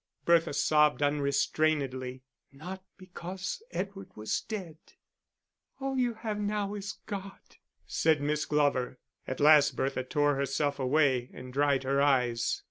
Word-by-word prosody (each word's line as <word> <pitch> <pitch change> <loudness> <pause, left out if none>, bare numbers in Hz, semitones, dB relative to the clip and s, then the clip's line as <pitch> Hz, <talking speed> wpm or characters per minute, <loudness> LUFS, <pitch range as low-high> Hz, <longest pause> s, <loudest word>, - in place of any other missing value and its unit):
Bertha 170 -1 +4
sobbed 150 0 +3
unrestrainedly 140 -2 0 0.3
not 180 +7 -8
because 185 - -6
Edward 195 - -5
was 110 0 -2
dead. 185 -8 -6 1.0
"All 270 0 -2
you 245 -3 +1
have 215 -2 -4
now 205 -1 -1
is 205 0 -5
God," 195 -2 -8 0.3
said 160 -2 +2
Miss 150 +1 0
Glover. 145 -4 +1 0.3
At 130 - -4
last 145 -2 +6
Bertha 135 0 -1
tore 145 +1 +1
herself 140 +1 -1
away 130 -2 +2
and 125 0 -9
dried 140 -1 +2
her 135 +1 +1
eyes. 125 -4 +2
150 Hz, 125 wpm, -30 LUFS, 135-190 Hz, 1.0 s, last